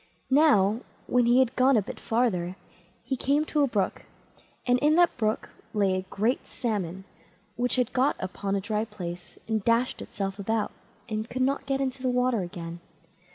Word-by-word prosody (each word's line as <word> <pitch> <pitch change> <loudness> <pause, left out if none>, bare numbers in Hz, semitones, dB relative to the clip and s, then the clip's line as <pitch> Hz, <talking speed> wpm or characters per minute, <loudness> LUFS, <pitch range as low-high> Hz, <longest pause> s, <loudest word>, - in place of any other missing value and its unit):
Now, 235 -8 +5 0.3
when 245 -1 +3
he 240 +1 +5
had 260 -1 +3
gone 255 0 +5
a - - +4
bit - - -8
further, 190 -7 0 0.5
he 265 - -1
came 285 +4 +1
to 305 -1 +1
a 285 - +4
brook, 205 -6 -1 0.6
and 245 0 +3
in 300 +3 +4
the 350 0 +7
brook 215 -2 -1 0.3
lay 200 -2 +3
a 185 0 -3
great 225 +6 0
Salmon, 190 -6 -3 0.5
which 245 +1 +1
had 250 -1 0
got 265 +2 +3
upon 195 +1 -3
a 195 - 0
dry 210 +1 -1
place 180 -5 -7
and 220 -2 0
dashed 235 +3 +2
itself 195 0 -4
about, 220 +2 -1 0.4
and 215 +1 -3
could 255 +1 -1
not 275 +1 0
get 270 -1 0
into 265 -1 -2
the 255 - +1
water 250 -3 +2
again. 175 -1 -6
230 Hz, 180 wpm, -27 LUFS, 195-255 Hz, 0.6 s, the